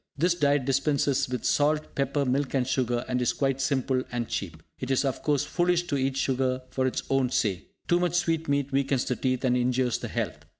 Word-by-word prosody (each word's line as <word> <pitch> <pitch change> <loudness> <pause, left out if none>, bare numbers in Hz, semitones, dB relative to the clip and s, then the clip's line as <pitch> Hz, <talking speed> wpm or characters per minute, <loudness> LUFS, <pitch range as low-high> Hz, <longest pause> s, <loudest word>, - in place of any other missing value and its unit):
This 170 +4 +3
diet 145 -5 +2
dispenses 140 0 +1
with 125 -2 -3
salt, 150 +1 +1
pepper, 140 +1 0
milk 135 +2 0
and 130 -2 +2
sugar, 125 -2 0
and 125 -1 -1
is 120 - +1
quite 135 -1 0
simple 130 -1 +1
and 120 -2 -2
cheap. 80 -5 -5 0.2
It 130 - -5
is, 135 +1 +2
of 135 - -2
course, 145 -3 +1
foolish 175 0 +1
to 165 -5 -3
eat 135 0 0
sugar 130 -1 0
for 130 0 0
its 130 - -2
own 135 -2 +2
sake. 100 -7 -1 0.2
Too 175 - +3
much 175 -1 0
sweetmeat 160 -5 0
weakens 135 -1 +1
the 125 - -1
teeth, 130 0 -1
and 125 -1 +3
injures 125 0 +1
the - - -5
health. - - -3
135 Hz, 210 wpm, -27 LUFS, 125-145 Hz, 0.2 s, This